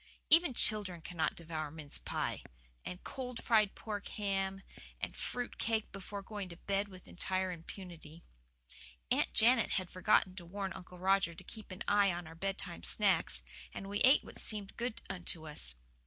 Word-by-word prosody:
Even 325 -5 +7
children 205 -6 +5
cannot 165 -1 -1
devour 155 -2 -4
mince 150 -1 -4
pie, - - -2 0.4
and 180 - -7
cold 250 -3 -5
fried 215 -4 +4
pork 205 -2 -5
ham, 195 -1 -2 0.4
and - - -4
fruit 245 -1 -3
cake 220 -1 0
before 200 +1 -7
going 205 -2 -5
to 170 - -10
bed 200 +2 -1
with 185 -2 -13
entire 185 +1 -1
impunity. 170 -2 -10 0.9
Aunt - - +3
Janet 235 +1 +6
had 185 -3 -1
forgotten 185 0 +3
to 175 - -6
warn 195 +1 -3
Uncle 180 0 -10
Roger 190 -2 +2
to - - -11
keep 215 -3 -9
an 185 - -5
eye 205 -1 +5
on 175 0 -4
our 160 - -10
bedtime 190 - -4
snacks, - - +3 0.3
and 195 - -5
we 205 +1 -1
ate 260 +4 +6
what - - -11
seemed 205 -3 -4
good 240 -1 -3
unto 175 -4 -2
us. 65 - 0
195 Hz, 170 wpm, -34 LUFS, 170-210 Hz, 0.9 s, Even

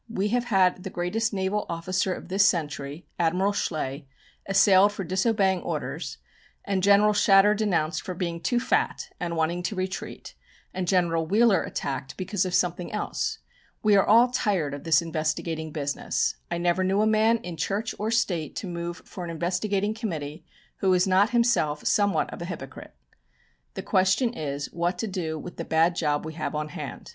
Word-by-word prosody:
"We 210 -2 -1
have 245 +2 0
had 190 -5 +2
the 190 - -6
greatest 190 +6 -1
naval 200 +1 -1
officer 185 +3 -1
of - - -6
this 195 +2 +3
century, 150 -4 -1
Admiral 180 +4 +2
Schley, 145 -6 -3 0.4
assailed 195 0 +5
for 205 -1 -5
disobeying 190 +1 +1
orders, - - -4 0.5
and 195 -2 0
General 200 +2 +5
Shatter 205 0 +5
denounced 185 -7 0
for 185 - -6
being 170 -2 -3
too 245 +5 +1
fat - - 0
and 170 -1 -3
wanting 165 +2 0
to 180 +4 -3
retreat, 185 +1 -5 0.4
and 185 -1 -3
General 170 -3 +1
Wheeler 215 +2 +4
attacked 135 0 -4
because 190 0 -1
of 180 - -1
something 175 0 0
else. - - -2 0.5
We 210 -1 +5
are 195 - +5
all 235 +3 +5
tired 190 - 0
of 145 - -7
this 165 +1 +4
investigating 160 0 -2
business. 145 -2 -1
I 175 - -2
never 175 +2 +1
knew 195 +2 +2
a - - +3
man 220 +1 +3
in 175 -6 -7
Church 200 +8 -2
or 210 +2 -1
State 180 - 0
to 200 - -4
move 170 0 -5
for 180 - -8
an 170 - -5
investigating 190 +5 -1
committee 165 -8 -5 0.3
who 195 - 0
was 180 -1 +4
not 190 +2 +4
himself 235 -12 +1
somewhat 205 -1 +1
of - - -8
a - - -3
hypocrite. 145 - -8 0.8
The - - -5
question 190 +6 +2
is 145 -6 -4
what 175 +2 -1
to 225 - -2
do 170 -5 -3
with 175 +3 -9
the 165 - -3
bad 165 +2 +2
job 150 -3 0
we 160 - -6
have 155 -1 -4
on 150 0 -3
hand. - - -7
185 Hz, 180 wpm, -26 LUFS, 165-205 Hz, 0.8 s, assailed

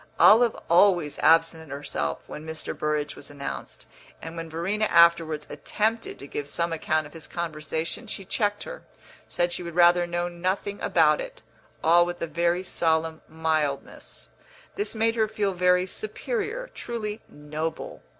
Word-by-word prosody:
Olive 230 +1 +7
always 175 -3 +4
absented 165 -1 +3
herself 135 - -3
when 150 - -8
Mr. 160 0 -5
Burrage 150 -1 -1
was - - -11
announced; 140 -1 -7 0.3
and 165 0 -8
when 165 -1 -6
Verena 190 +7 0
afterwards 170 -4 +4
attempted 225 +2 -2
to - - -10
give 145 0 -5
some 170 +2 -1
account 155 -1 0
of 150 - -13
his 165 -2 -10
conversation 160 +4 -4
she 195 -2 -6
checked 205 +1 0
her, - - -8 0.5
said 175 0 0
she 175 - -3
would 170 -1 -7
rather 175 0 +5
know 175 0 -1
nothing 185 +3 -2
about - - +3
it - - -9 0.4
all 170 +2 +6
with 175 0 -4
a - - -1
very 170 +3 0
solemn 160 -2 0
mildness; 155 -3 -2 0.5
this 410 - -2
made 225 +1 +2
her 220 -2 +2
feel 210 -2 -1
very 180 0 +3
superior, 475 - -4
truly 220 -2 -5
noble. 150 +2 -5
170 Hz, 150 wpm, -26 LUFS, 160-205 Hz, 0.5 s, Olive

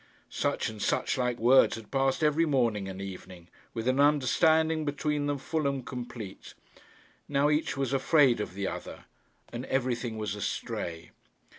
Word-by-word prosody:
Such - - -1
and 110 -2 -7
such - - 0
like 125 -2 0
words 125 +3 +5
had 110 -2 -11
passed 135 +2 +1
every 155 +2 +3
morning 115 -8 +1
and 95 0 -7
evening, 90 -2 -9 0.3
with 115 +1 -3
an 130 +1 +2
understanding 155 +3 +3
between 145 0 -1
them 145 0 0
full 155 +2 -2
and 135 -3 -2
complete. 120 -5 -8 0.7
Now 145 +1 +2
each 150 -2 0
was 135 -1 -1
afraid 135 -2 +4
of 95 - -5
the 100 0 -3
other, - - -7 0.5
and 120 +1 -4
everything 120 -3 -1
was 105 -2 -3
astray. 85 -4 -4
130 Hz, 155 wpm, -29 LUFS, 110-145 Hz, 0.7 s, words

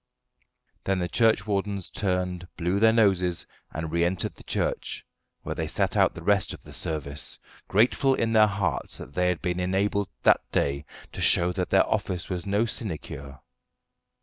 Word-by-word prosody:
Then 95 0 +1
the 90 -1 -1
churchwardens 105 -3 +1
turned, 90 -2 -1
blew 90 +3 0
their 110 +1 +6
noses, 95 -6 +2 0.3
and 80 0 -4
re 85 +1 +2
entered 90 +1 -1
the - - -15
church, - - -2 0.4
where - - -3
they - - -3
sat - - 0
out - - +3
the 85 - -8
rest 100 +1 +2
of - - -18
the - - -12
service, 75 -2 -3 0.3
grateful 125 +6 +3
in 115 -2 0
their 110 -1 +7
hearts 100 -1 -2
that 65 - -10
they 90 +2 +1
had 90 - -2
been 90 0 -1
enabled 95 +2 0
that - - +5
day 70 +1 0 0.3
to - - -6
show 90 +1 +4
that 90 0 -2
their 95 - +4
office 95 -4 -2
was 90 +1 -3
no 100 +3 +2
sinecure. 70 - -5
95 Hz, 170 wpm, -26 LUFS, 85-105 Hz, 0.4 s, their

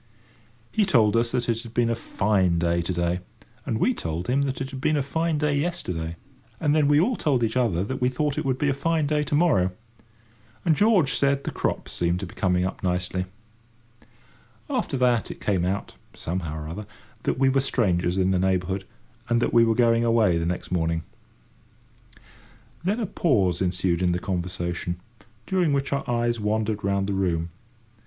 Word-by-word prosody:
He 215 - +2
told 115 - +3
us 115 0 +2
that 125 -2 -1
it 115 -1 0
had 115 -1 -12
been 120 -1 +2
a - - +1
fine 100 -6 +1
day 85 0 +1
to 85 - -3
day, 85 0 0 0.5
and 115 -5 0
we 250 - +2
told 85 - -4
him 130 +3 +2
that 130 - -4
it 135 0 -4
had 135 -1 -7
been 155 +2 +2
a 140 - +1
fine 160 +3 -1
day 150 -1 +1
yesterday, 90 - -2 0.4
and 150 -2 +2
then 150 -2 +4
we 145 0 +5
all 235 +9 +2
told 140 - +1
each 115 +1 0
other 110 -9 +1
that 130 +6 -4
we 125 - +3
thought 145 +2 -1
it - - -2
would 130 -2 0
be 145 - 0
a - - +2
fine 160 +2 0
day 150 +1 +1
to 145 - -1
morrow; 145 - +3 1.0
and 165 -3 +4
George 200 -7 +4
said 140 0 +2
the - - -3
crops - - -2
seemed 85 +1 0
to 95 - -4
be 90 - -11
coming 90 -1 +1
up 95 - -4
nicely. 90 0 -1 1.5
After 135 - -1
that 125 -2 +2
it - - -8
came 95 -4 0
out, 95 +2 -2 0.2
somehow 80 -3 -4
or - - -7
other, 100 +6 -6 0.3
that - - -1
we 135 0 +3
were 135 0 +3
strangers 90 -9 +1
in 95 0 +2
the 95 - +2
neighbourhood, 95 +1 0 0.4
and 120 0 +3
that 120 - 0
we 115 - +6
were 115 -1 +2
going 115 -1 +3
away 115 -7 +3
the 85 - -1
next 90 +1 -3
morning. 80 -2 0 1.1
[Picture: - - -30
The - - -25
trout] - - -25
Then 205 +5 +1
a - - 0
pause 100 - +1
ensued 90 -1 0
in 90 -1 +2
the - - 0
conversation, 90 -1 -3 0.5
during 180 -2 +1
which 140 0 0
our 140 -1 -2
eyes 120 -1 0
wandered 105 0 -1
round 100 0 +1
the 100 - -2
room. 85 -3 -1
110 Hz, 205 wpm, -25 LUFS, 90-140 Hz, 1.5 s, we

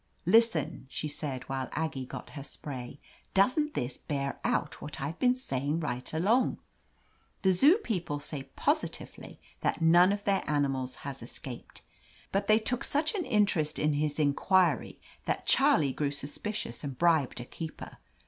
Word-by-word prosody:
"Listen," 225 - +3
she 150 - -3
said 145 -3 -4
while 135 -1 -3
Aggie 140 -5 -2
got - - -8
her 140 - -7
spray, 135 -2 -6 0.4
doesn't 280 +10 +3
this 125 +1 -3
bear 140 -2 -3
out 150 - -1
what 150 - -7
IVe 145 +5 -4
been 250 0 +4
saying 145 - -2
right 125 -4 -3
along? 215 +11 +2 0.9
The 190 -1 +5
Zoo 290 - +6
people 180 - -3
say 145 -2 -6
positively - - -2 0.2
that - - 0
none 175 +3 +6
of 205 0 -2
their 200 -1 +1
animals 135 -3 0
has 135 -2 -5
escaped. 120 +1 -9 0.5
But 195 - 0
fl 215 - +6
they - - +7
took 235 +2 -1
such 300 +2 +2
an 385 -5 -2
interest 195 -9 +2
in 150 0 +2
his 150 0 0
inquiry 155 - +2 0.3
that - - -1
Charlie 140 -3 +4
grew 145 +1 0
suspicious 145 - -3
and 135 -3 -5
bribed 160 -8 +3
a 120 - -6
keeper. 160 +4 -8
150 Hz, 160 wpm, -30 LUFS, 140-200 Hz, 0.9 s, they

